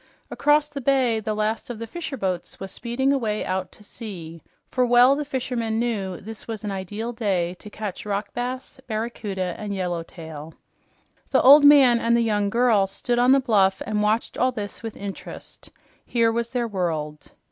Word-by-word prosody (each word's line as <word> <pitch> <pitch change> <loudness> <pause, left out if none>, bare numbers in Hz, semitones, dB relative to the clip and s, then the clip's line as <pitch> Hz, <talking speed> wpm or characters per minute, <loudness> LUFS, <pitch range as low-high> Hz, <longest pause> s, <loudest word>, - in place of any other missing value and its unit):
Across 295 +1 +3
the 285 -2 -6
bay 255 -4 +2
the 215 0 -3
last 215 +2 -1
of 240 - -5
the 230 - -5
fisherboats 225 - -4
was 195 0 -7
speeding 265 +6 0
away 220 -6 -1
out 185 -1 -2
to 210 - -16
sea, 175 -7 -9 0.3
for 255 - 0
well 245 +2 +6
the 295 - -2
fishermen 245 -5 -2
knew 205 -6 -2
this 220 +2 -10
was 220 -2 -5
an 210 - -3
ideal 205 +5 -4
day 190 -6 0
to 210 - -10
catch 210 -2 -6
rockbass, 245 +7 -4
barracuda 215 -5 -3
and 205 -1 -4
yellowtail. 165 -4 -5 0.7
The - - +3
old 285 +3 +9
man 270 -5 +7
and 235 0 +2
the - - +2
young 205 -2 +1
girl 230 -3 +3
stood 240 +5 -1
on 250 +1 +5
the 275 - +6
bluff 200 -7 +2
and 210 0 -1
watched 215 +2 0
all 255 +1 +3
this 210 -4 -6
with 225 -2 -7
interest. 200 -1 -9 0.3
Here 230 -2 +2
was 235 +1 -2
their 245 -2 -1
world. 160 -7 -3
220 Hz, 175 wpm, -24 LUFS, 195-245 Hz, 0.7 s, old